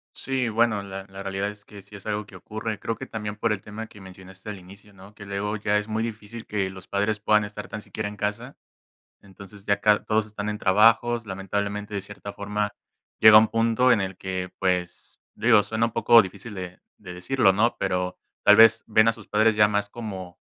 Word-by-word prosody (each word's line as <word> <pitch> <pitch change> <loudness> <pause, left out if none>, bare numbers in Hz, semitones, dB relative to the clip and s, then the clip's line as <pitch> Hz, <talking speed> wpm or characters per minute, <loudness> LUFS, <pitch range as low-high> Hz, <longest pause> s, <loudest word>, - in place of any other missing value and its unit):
Sí, 130 -3 -2
bueno, 110 -1 +1
la 95 -1 -8
la 95 0 -9
realidad 95 +1 -2
es 105 0 -12
que 100 -1 -13
sí 100 - -15
es 100 - -12
algo 105 0 -2
que 100 - -16
ocurre, 110 +3 -5
creo 115 - -3
que - - -7
también 105 -1 -5
por 115 +1 -1
el 100 - -5
tema 110 +2 -8
que 105 - -15
mencionaste 95 +1 -12
al 100 - -6
inicio, 100 +3 -15
¿no?, 95 +2 -15
que 100 -1 -12
luego 100 +2 -3
ya 105 0 +1
es 105 +1 -3
muy 110 +1 -2
difícil 115 0 -7
que 100 -2 -1
los 95 -1 -12
padres 105 +2 -1
puedan 105 +1 +3
estar 105 0 -7
tan 110 - -7
siquiera 105 0 -5
en 105 - -11
casa, 105 +6 -4 0.6
entonces, 100 +1 -14
ya 100 0 +1
cad 105 0 +3
todos 110 -1 +1
están 105 0 -5
en 105 0 -3
trabajos, 115 +4 +3
lamentablemente, 100 +2 -4
de 100 - -1
cierta 100 0 -9
forma, 105 +1 -3 0.5
llega 110 -1 +10
un 110 - +5
punto 115 +3 +3
en 115 - +3
el 95 -1 -4
que, 95 -1 -5
pues, 90 -2 -2
digo, 110 -1 +4
suena 110 +2 0
un 115 - -6
poco 115 +1 +6
difícil 105 +4 -9
de 90 -2 -8 0.2
de 90 -3 -10
decirlo, 95 +3 +2
¿no?, 115 +5 +1
pero, 90 0 -2 0.3
tal - - +8
vez, 115 0 +6
ven 110 0 +4
a - - +4
sus 110 -3 -14
padres 110 +1 +3
ya 105 0 +5
más 105 0 -1
como 95 -6 -8
105 Hz, 220 wpm, -25 LUFS, 95-110 Hz, 0.6 s, llega